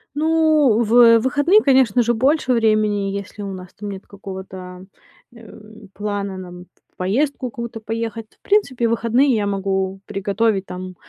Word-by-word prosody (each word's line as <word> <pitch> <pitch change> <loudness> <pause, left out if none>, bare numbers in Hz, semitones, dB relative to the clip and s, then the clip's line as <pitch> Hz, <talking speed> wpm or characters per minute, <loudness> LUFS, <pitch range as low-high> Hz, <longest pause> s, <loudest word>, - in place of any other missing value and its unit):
Ну, 310 -6 +3
в 230 +1 +6
выходные, 290 - +3
конечно 260 - +3
же, 240 0 +1
больше 260 +3 +1
времени, 215 -3 +1
если 200 +1 -6
у 195 - -5
нас 180 -1 -10
там 205 0 -7
нет 195 -1 -9
какого-то, 190 -2 -9 0.5
э, 230 -1 -14 0.3
плана, 200 -2 -4
нам, 180 -1 -10 0.3
в - - -44
поездку 255 +7 -1
какую-то 235 -1 -7
поехать. 225 0 -4
В - - -59
принципе, 280 - +1
в - - -1
выходные 235 +4 +2
я 215 -3 0
могу 195 -1 -2
приготовить, 200 0 -1
там, 185 0 -8
220 Hz, 150 wpm, -20 LUFS, 195-245 Hz, 0.5 s, в